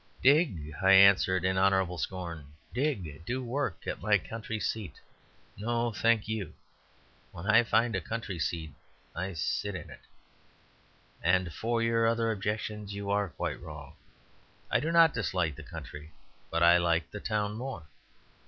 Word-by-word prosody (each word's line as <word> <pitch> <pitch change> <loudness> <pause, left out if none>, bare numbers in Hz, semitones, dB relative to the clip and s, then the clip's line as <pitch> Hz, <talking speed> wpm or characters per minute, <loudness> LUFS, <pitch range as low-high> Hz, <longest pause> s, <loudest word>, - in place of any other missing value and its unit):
"Dig!" 130 - +3
I 95 0 +6
answered, 95 -2 +6
in 95 0 +2
honourable 95 -2 +2
scorn. 85 -6 -5 0.2
"Dig! 100 - -2
Do 125 +7 -3
work 125 -5 -3
at - - -4
my 105 +1 +4
Country 110 +3 -6
Seat; 105 -8 -4 0.6
no, 120 +2 0
thank 115 0 +2
you. 110 -3 -4 0.8
When 85 - -9
I 110 +3 +6
find 115 0 +2
a 95 - -1
Country 105 -1 -5
Seat, 80 -2 -3 0.4
I 95 +2 -3
sit 90 +4 -2
in - - -8
it. - - -12 1.2
And 90 -1 +2
for 115 +4 -1
your 115 0 +2
other 115 0 +1
objection, 105 0 -3
you 100 0 -4
are 100 -1 +1
quite - - -4
wrong. - - -9 0.8
I - - +4
do 160 - -1
not 165 -2 +6
dislike 90 - -1
the - - -10
country, 75 +2 -9 0.4
but 85 +1 +1
I 85 +1 +7
like 85 -1 0
the 105 - -6
town 105 -1 -1
more. 120 -5 -6
100 Hz, 155 wpm, -30 LUFS, 90-115 Hz, 1.2 s, I